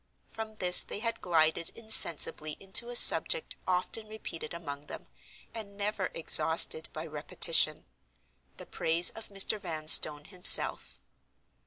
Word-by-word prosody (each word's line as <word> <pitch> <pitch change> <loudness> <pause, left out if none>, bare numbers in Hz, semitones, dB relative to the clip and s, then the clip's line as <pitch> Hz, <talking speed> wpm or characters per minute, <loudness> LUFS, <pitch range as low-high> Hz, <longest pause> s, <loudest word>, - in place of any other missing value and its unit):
From 220 -1 -11
this 180 -3 +2
they - - -9
had 230 +2 -7
glided 160 -1 -1
insensibly 165 -8 +2
into 195 +5 -1
a 245 - -9
subject 480 - +4
often 185 +4 -6
repeated 215 -7 -11
among 145 -4 -11
them, - - -12 0.5
and 200 -3 -11
never 205 -2 -5
exhausted 160 0 +2
by - - -10
repetition—the - - -5
praise 165 +2 -1
of 225 - -13
Mr. 200 +1 0
Vanstone 155 -4 +2
himself. 185 0 0
180 Hz, 120 wpm, -26 LUFS, 160-215 Hz, 0.5 s, subject